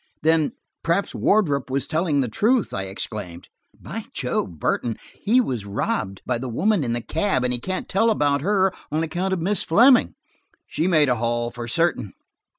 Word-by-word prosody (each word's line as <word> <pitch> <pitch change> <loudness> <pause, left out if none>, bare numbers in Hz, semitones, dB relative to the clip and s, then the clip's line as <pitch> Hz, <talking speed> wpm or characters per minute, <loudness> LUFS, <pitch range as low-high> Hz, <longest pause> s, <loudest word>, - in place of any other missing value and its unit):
"Then–perhaps 165 +3 0
Wardrop 145 -11 +1
was 135 +1 0
telling 155 -3 +1
the 130 - -1
truth," 225 - +1
I 95 - -3
exclaimed. 95 -2 -6 0.3
"By - - -7
Jove, 85 - -2
Burton, 115 +8 -1 0.2
he 225 +5 +3
was 125 - -1
robbed 95 -1 -2
by 125 -2 -1
the 130 +1 -5
woman 195 - +1
in 120 -2 -1
the 120 - -2
cab, 160 - 0
and 125 0 +1
he 120 - -1
can't 185 +8 -4
tell 225 +4 +2
about 145 -9 +1
her 190 +2 +2 0.2
on 155 +2 0
account 180 +4 -2
of 190 -3 -1
Miss 195 +3 0
Fleming! 240 +9 +5 0.5
She 165 - -1
made 155 -5 +4
a 125 -1 +2
haul, 120 +1 -1
for 120 -1 -7
certain." 125 - 0
150 Hz, 175 wpm, -23 LUFS, 120-190 Hz, 0.5 s, Fleming